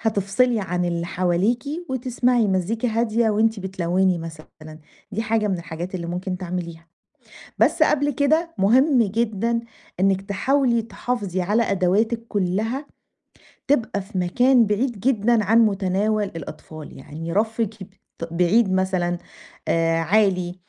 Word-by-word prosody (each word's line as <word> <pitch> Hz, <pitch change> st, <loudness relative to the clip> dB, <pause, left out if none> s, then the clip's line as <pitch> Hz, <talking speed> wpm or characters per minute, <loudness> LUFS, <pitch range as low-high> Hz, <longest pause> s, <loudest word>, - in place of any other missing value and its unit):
هتِفصِلي 220 Hz, +3 st, +1 dB
عن 180 Hz, -2 st, -2 dB
اللي 170 Hz, -1 st, -2 dB
حواليكِ 185 Hz, +7 st, 0 dB, 0.2 s
وتِسمَعي 250 Hz, -2 st, +1 dB
مزّيكا 195 Hz, +6 st, 0 dB
هادية 225 Hz, 0 st, +1 dB
وأنتِ 220 Hz, 0 st, +1 dB
بتلوّني 185 Hz, -1 st, 0 dB
مثلًا. 155 Hz, -1 st, -10 dB, 0.3 s
دي 220 Hz, -, -2 dB
حاجة 220 Hz, -1 st, 0 dB
من 190 Hz, -3 st, -1 dB
الحاجات 170 Hz, +2 st, -6 dB
اللي 170 Hz, -2 st, -4 dB
ممكن 180 Hz, +2 st, -3 dB
تعمليها. 170 Hz, -2 st, -6 dB, 0.7 s
بس -, -, +3 dB
قبل 290 Hz, 0 st, +3 dB
كده، 315 Hz, +5 st, +1 dB
مهم 250 Hz, +7 st, +4 dB
جدًا 230 Hz, +2 st, 0 dB, 0.4 s
إنِّك 195 Hz, 0 st, +2 dB
تحاولي 235 Hz, +5 st, +1 dB
تحافظي 220 Hz, -5 st, -3 dB
على 210 Hz, +6 st, +2 dB
أدواتِك 215 Hz, +4 st, 0 dB
كُلّها 215 Hz, +8 st, -1 dB, 0.8 s
تبقى 240 Hz, -7 st, +1 dB
في 190 Hz, 0 st, -6 dB
مكان 245 Hz, +7 st, +3 dB
بعيد 210 Hz, +2 st, -1 dB
جدًا 230 Hz, -2 st, +2 dB
عن 225 Hz, +4 st, +4 dB
مُتَناول 205 Hz, +1 st, 0 dB
الأطفال. 160 Hz, -4 st, -9 dB
يعني 160 Hz, +5 st, -7 dB
رفِّك 220 Hz, +1 st, -1 dB
يبط 190 Hz, -, -12 dB, 0.4 s
بعيد 185 Hz, +5 st, +2 dB
مثلًا، 185 Hz, -2 st, 0 dB, 0.5 s
آآ 165 Hz, 0 st, +2 dB
عالي، 180 Hz, 0 st, +1 dB
200 Hz, 125 wpm, -22 LUFS, 180-230 Hz, 0.8 s, مهم